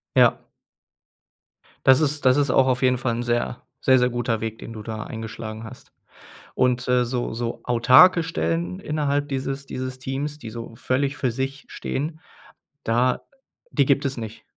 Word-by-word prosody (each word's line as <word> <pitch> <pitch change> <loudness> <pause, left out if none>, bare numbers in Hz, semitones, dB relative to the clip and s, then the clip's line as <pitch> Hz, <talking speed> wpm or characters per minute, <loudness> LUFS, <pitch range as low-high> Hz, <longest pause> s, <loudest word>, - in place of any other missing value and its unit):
Ja. - - +5 1.5
Das 130 +3 +6
ist 145 -1 0
das 130 0 +6
ist 145 -2 +2
auch 130 0 +4
auf 125 0 +1
jeden 125 -1 +3
Fall 120 -1 -1
'n 120 - -2
sehr, 120 +1 -1 0.2
sehr, 130 -1 +4
sehr 125 0 +3
guter 120 -2 -1
Weg, 110 0 -4
den 115 - -9
du 110 - -7
da 110 0 -5
eingeschlagen 110 -1 -7
hast. 115 +3 -12 0.6
Und, 125 0 +1
äh, 125 -1 +3
so 120 -1 -2
so 115 +1 -4
autarke 130 +9 +6
Stellen 165 +2 -2
innerhalb 145 -4 -1
dieses 135 +1 -3
dieses 130 -1 -5
Teams, 140 +3 -4
die 115 -6 -8
so 115 0 -8
völlig 135 +3 -1
für 130 -4 0
sich 135 +3 -4
stehen, 155 +4 -4 0.6
da 125 +2 +1 0.5
die 140 -2 +2
gibt 140 +1 +2
es 135 -1 -1
nicht? 110 -1 -7
130 Hz, 170 wpm, -23 LUFS, 120-140 Hz, 1.5 s, Das